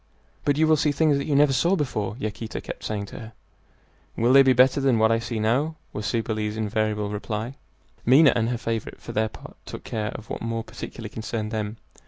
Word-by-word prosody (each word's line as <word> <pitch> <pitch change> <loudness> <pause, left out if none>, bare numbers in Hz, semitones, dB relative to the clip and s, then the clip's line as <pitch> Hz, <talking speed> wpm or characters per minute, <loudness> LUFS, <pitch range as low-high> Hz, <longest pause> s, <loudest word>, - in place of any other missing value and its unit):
"But 145 -1 +2
you 160 - +4
will 155 0 +4
see 150 +1 +2
things 145 -1 +2
that - - -3
you 145 - +1
never 145 -1 +5
saw 170 +9 +3
before," 110 - -2
Yaquita 110 -1 -4
kept - - -8
saying 105 -1 -3
to - - -9
her. 110 0 -10 0.8
"Will 120 +3 +3
they 135 - +9
be 135 -1 +5
better 130 +2 +4
than 135 -4 +3
what 110 0 +4
I 115 - +3
see 115 -1 -4
now?" 130 +9 +1 0.2
was 105 -1 -3
Cybele's 110 -2 -1
invariable 105 -1 -1
reply. 110 +3 -4 0.5
Minha 140 +5 +6
and 115 -1 +1
her 125 - -1
favorite 115 -2 -4
for - - -8
their 110 +1 0
part - - -13
took - - -7
care 105 -1 -3
of 110 - -8
what - - -5
more 115 0 -2
particularly 115 0 -8
concerned 110 -1 -4
them. 110 0 -3
115 Hz, 215 wpm, -25 LUFS, 110-135 Hz, 0.8 s, they